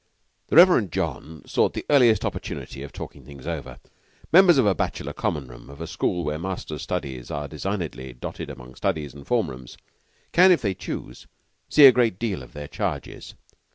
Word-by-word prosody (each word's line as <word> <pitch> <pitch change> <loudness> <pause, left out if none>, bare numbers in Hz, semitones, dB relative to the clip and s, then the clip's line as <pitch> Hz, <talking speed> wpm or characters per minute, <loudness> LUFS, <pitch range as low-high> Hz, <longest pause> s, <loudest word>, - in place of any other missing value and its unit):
The - - -2
Reverend 165 - +7
John 80 0 -4
sought - - +1
the - - -4
earliest 120 -8 +4
opportunity 65 - -5
of 70 - -8
talking - - -9
things 70 -3 -12
over. 65 0 -5 0.6
Members 175 -3 +7
of 130 - +4
a 100 - +4
bachelor - - -3
Common 70 -3 -2
room, - - -13
of 70 - -12
a 85 - -4
school 85 +1 -1
where 75 0 -2
masters' 85 -4 -5
studies 65 -3 -4
are 70 0 -4
designedly 80 -6 -4
dotted - - -7
among 65 -2 -10
studies 80 -7 -2
and 70 -1 -13
form 120 - +1
rooms, 65 -1 -11 0.5
can, 185 +2 +6
if 175 - +3
they 100 -3 +1
choose, - - -7 0.4
see 150 - +8
a 135 - +11
great 120 -6 +1
deal 100 - -2
of 60 - -13
their 75 0 -7
charges. - - -5
80 Hz, 185 wpm, -24 LUFS, 70-115 Hz, 0.6 s, a